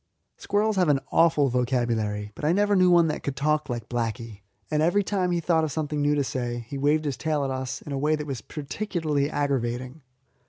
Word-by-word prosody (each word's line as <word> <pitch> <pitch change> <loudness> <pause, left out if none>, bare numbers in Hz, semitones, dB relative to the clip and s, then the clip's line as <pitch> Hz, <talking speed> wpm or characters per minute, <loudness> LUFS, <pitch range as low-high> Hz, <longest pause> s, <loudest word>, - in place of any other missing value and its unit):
Squirrels 210 +1 0
have 180 -4 +3
an 140 -2 +4
awful 155 -4 +4
vocabulary, 120 -4 -1
but - - -11
I 155 +3 +3
never 205 +1 +2
knew 185 -1 +5
one 175 -1 +6
that 150 - -3
could 140 - -3
talk 150 +1 0
like 120 -2 -4
Blacky. 115 -3 -4 0.3
And 150 0 +2
every 175 +6 +3
time 190 -2 0
he 175 -1 +1
thought 165 -1 +2
of 155 - -1
something 150 0 -2
new 145 +1 +2
to 145 - +1
say 120 -3 -3
he - - -5
waved 150 +3 +1
his 140 -3 -1
tail 155 -3 -1
at 135 - -2
us 130 -1 -4
in 145 - -8
a 135 - -2
way 150 +2 +2
that 150 -1 -5
was 135 -6 -5
particularly 150 - -2
aggravating. 130 -1 -2
145 Hz, 220 wpm, -26 LUFS, 125-160 Hz, 0.3 s, one